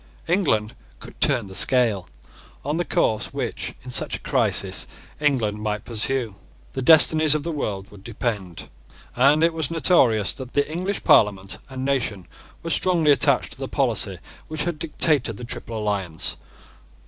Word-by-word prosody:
England 150 - 0 0.2
could - - -14
turn 125 -6 +2
the 95 - -11
scale. 115 -5 +2 0.6
On 150 +3 -2
the 175 - 0
course 110 -7 0
which, - - -4
in 125 - -9
such - - 0
a - - -7
crisis, - - 0 0.3
England 120 -8 0
might 105 -1 -4
pursue, 115 0 0 0.4
the 135 - -4
destinies 155 +1 +7
of 150 - -2
the 170 - -4
world 105 -10 -5
would 100 -2 -15
depend; 105 -6 -5 0.5
and 140 +5 +3
it 165 0 +2
was 160 -4 -3
notorious 130 - +3
that 130 -2 -10
the 145 0 +1
English 185 +5 -3
Parliament 100 -2 +2
and 130 0 -6
nation 110 -9 -2 0.4
were 165 - -4
strongly 165 -5 +2
attached 140 - +2
to - - -9
the - - -5
policy - - 0 0.3
which 155 -1 -3
had 170 -2 -4
dictated 150 -8 0
the - - -9
Triple 115 -1 -6
Alliance. 100 -6 -3
130 Hz, 160 wpm, -22 LUFS, 105-155 Hz, 0.6 s, destinies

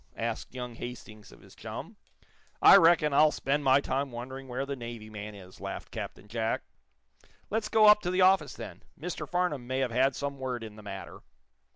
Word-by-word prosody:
asked 115 +2 -4
young 125 -1 -5
Hastings 115 -3 -9
of - - -16
his - - -17
chum. - - -8 0.6
"I - - +9
reckon 165 -3 +5
I'll 155 +2 +6
spend 145 0 -1
my 135 0 +5
time 140 -1 -2
wondering 130 +3 -7
where 130 +2 -3
the 140 0 -4
Navy 115 -3 -8
man 105 0 -7
is," 95 -2 -13
laughed - - -6
Captain 105 - -7
Jack. 110 +1 -1 0.9
"Let's 215 0 -1
go 220 -1 +5
up 210 0 +8
to 175 - -2
the 185 +1 +1
office, 185 -5 +4
then. - - -9 0.2
Mr. 160 -2 -5
Farnum 175 -9 -1
may 130 +1 -2
have 130 -2 0
had 130 +3 +2
some 140 -1 -4
word 125 -3 -3
in 110 -2 -9
the 105 - -12
matter." 100 -2 -8
130 Hz, 195 wpm, -29 LUFS, 115-150 Hz, 0.9 s, I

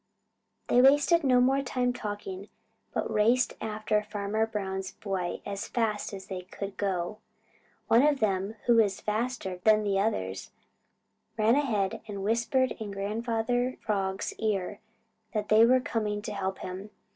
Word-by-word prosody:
They 245 - +5
wasted 290 +5 +5
no 255 -2 +4
more 265 +2 +3
time 250 -2 0
talking, 205 -3 -6 0.4
but - - -2
raced 235 +4 +3
after 215 -1 0
Farmer 210 +1 -1
Brown's 190 -3 -4
boy 190 -4 -3
as 200 -1 -4
fast 220 -3 -1
as 195 -2 -8
they 185 -2 -5
could 195 +2 -7
go. 195 +1 -2 0.7
One 230 - +6
of 290 -1 +3
them, 195 0 0
who 240 -1 +5
was 205 -4 +3
faster 215 -3 -2
than 215 -1 +5
the 200 -1 +1
others, 95 - -2 0.9
ran 220 +1 +4
ahead 225 -6 0
and 200 -2 -5
whispered 235 +4 +1
in 215 -2 -5
Grandfather 225 +5 -1
Frog's 195 -2 -1
ear 205 -3 -1 0.6
that 210 -1 -1
they 220 +2 +7
were 255 +1 +5
coming 210 -4 -2
to 210 - -4
help 190 -1 -2
him. 185 +3 -7
215 Hz, 145 wpm, -28 LUFS, 195-235 Hz, 0.9 s, they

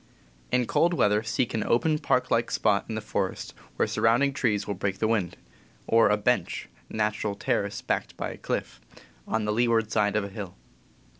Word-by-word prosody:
In 125 -1 +2
cold 170 +8 +2
weather 105 -6 +3
seek 115 +2 -1
an 110 - 0
open, 155 +6 +2
park 125 - +1
like 115 +1 +2
spot 100 -1 +1
in 110 - -3
the 110 - -3
forest, 105 - -3 0.2
where - - +1
surrounding 125 +5 +2
trees 105 -7 0
will 100 - -2
break 95 0 -2
the 110 - +1
wind; 105 -6 0 0.5
or 115 -1 +4
a 105 - +3
"bench" 125 +4 0 0.2
(natural 105 -1 -1
terrace - - -1
backed - - -2
by - - -3
a - - -9
cliff) - - -4 0.5
on 110 -1 -1
the 105 - 0
leeward 115 -1 +2
side 105 -2 +2
of 105 - +2
a 100 - -5
hill. 100 -3 -7
110 Hz, 190 wpm, -27 LUFS, 105-115 Hz, 0.5 s, or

